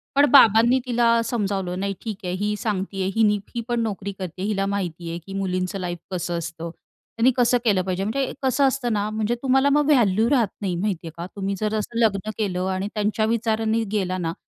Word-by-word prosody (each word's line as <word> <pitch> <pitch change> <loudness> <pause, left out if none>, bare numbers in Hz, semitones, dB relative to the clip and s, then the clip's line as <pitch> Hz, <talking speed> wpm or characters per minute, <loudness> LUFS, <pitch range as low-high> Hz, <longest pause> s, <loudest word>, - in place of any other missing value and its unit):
पण 285 - +6
बाबांनी 235 -1 +6
तिला 235 -1 +3
समजावलं, 195 -6 -2
"नाही 200 +1 -1
ठीक 220 -4 -5
आहे, 180 - -2
ही 210 +2 -1
सांगते 195 -2 -3
आहे. 190 - 0
हीने 210 -2 +3 0.2
ही 235 - -1
पण 240 -1 0
नोकरी 200 -3 -3
करते 185 -2 -7
आहे. 195 - -1
हिला 195 -2 0
माहिती 175 -4 -4
आहे 170 +1 -4
की 195 - -8
मुलींचं 185 0 -2
लाईफ 175 -1 -3
कसं 175 -1 -2
असतं. 170 0 -5 0.5
त्यांनी 240 +3 +5
कसं 245 0 +4
केलं 200 -5 +3
पाहिजे." 185 +1 -2
म्हणजे 260 +6 -1
कसं 265 +2 +2
असतं 260 -3 -1
ना, 205 0 0
म्हणजे 215 +2 -1
तुम्हाला 270 +1 +3
मग 295 +1 +3
व्हॅल्यू 225 -4 +3
राहत 250 -6 +3
नाही 190 -3 -1
माहिती 180 -2 -2
आहे - - -6
का 170 - -5
तुम्ही 200 0 -2
जर 215 0 -1
असं 215 +2 -4
लग्न 215 -2 +1
केलं. 185 -4 -1
आणि 190 +2 -2
त्यांच्यावी 215 +1 0
विचाराने 225 0 0
गेला 185 -3 -1
ना 165 -2 -2
205 Hz, 210 wpm, -23 LUFS, 185-230 Hz, 0.5 s, पण